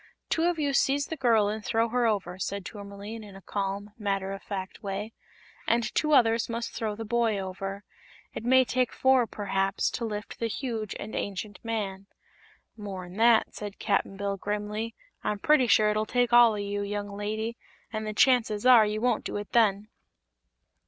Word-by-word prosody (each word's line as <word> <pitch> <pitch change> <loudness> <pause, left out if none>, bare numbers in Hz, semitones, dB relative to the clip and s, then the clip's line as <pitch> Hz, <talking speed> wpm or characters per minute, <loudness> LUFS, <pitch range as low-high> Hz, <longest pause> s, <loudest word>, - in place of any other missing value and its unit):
"Two 325 - +2
of 350 -1 +1
you 285 -2 0
seize 280 +1 +2
the 320 - -5
girl 230 -7 +3
and 215 +1 -3
throw 225 +1 +1
her 245 0 +2
over," 190 -4 -1
said 200 0 -3
Tourmaline, 205 +1 -8
in 200 -2 -12
a - - -9
calm, 200 +2 -3
matter 195 -2 -1
of 195 - -7
fact 190 -1 -6
way, 205 +2 -4 0.5
"and 230 -2 +1
two 305 -1 +1
others 230 -4 +4
must 230 0 -3
throw 215 -2 -2
the 225 +1 -6
boy 230 -1 +1
over. 195 +1 -5 0.5
It - - -6
may 260 +2 +5
take 255 0 0
four, 260 -2 +3
perhaps, 195 -1 -1
to - - -4
lift 210 -1 -5
the 230 - 0
huge 225 -3 -4
and 215 - -7
ancient 200 +1 -4
man." 200 -4 -3 0.7
"More'n 190 -4 -7
that," 230 0 +4
said 205 -1 -7
Cap'n 200 -2 0
Bill, 200 0 -2
grimly. 210 +3 -3 0.3
"I'm 210 - -1
pretty 275 +3 +4
sure 210 0 +5
it'll 215 +1 -1
take 245 +1 +1
all 240 -2 +8
o' - - -3
you, 205 0 -3
young 205 0 -4
lady, 215 +3 -3 0.4
an' 215 0 -2
the 215 - -3
chances 225 -4 +3
are 240 -4 +8
you 215 +1 -2
won't 245 -2 +1
do - - -4
it 205 0 -6
then." 210 -3 +3
215 Hz, 185 wpm, -28 LUFS, 200-235 Hz, 0.7 s, all